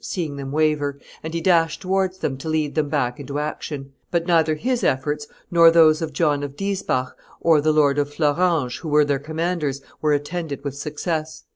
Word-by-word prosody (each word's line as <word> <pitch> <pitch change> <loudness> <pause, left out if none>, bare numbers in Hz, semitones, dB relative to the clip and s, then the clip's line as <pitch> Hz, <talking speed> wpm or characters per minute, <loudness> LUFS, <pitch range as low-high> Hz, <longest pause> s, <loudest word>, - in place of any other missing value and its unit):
seeing 160 -6 -3
them 135 -1 -6
waver, 150 -2 +1 0.2
and 160 +1 -6
he - - 0
dashed 165 -2 +2
towards 190 0 0
them 135 - -2
to 135 +4 -6
lead 155 -2 0
them 155 -2 0
back 125 -4 -1
into 140 0 -5
action; 145 -2 -5 0.2
but 170 -1 0
neither 160 -3 +3
his 245 +9 -1
efforts, 145 +3 0 0.2
nor 170 -1 +7
those 160 -1 +5
of 160 -1 -3
John 145 -1 +1
of 140 -1 -5
Diesbach 190 -10 -2 0.3
and 160 -3 +5
the 155 - +3
Lord 145 -2 +3
of 145 0 -1
Fleuranges, 150 -2 +1
who 160 - -6
were 150 0 +4
their 140 -1 0
commanders, 155 -2 -2 0.2
were 150 -1 +2
attended 145 0 -3
with 140 -2 -4
success. 155 +2 -4
155 Hz, 190 wpm, -22 LUFS, 145-165 Hz, 0.3 s, nor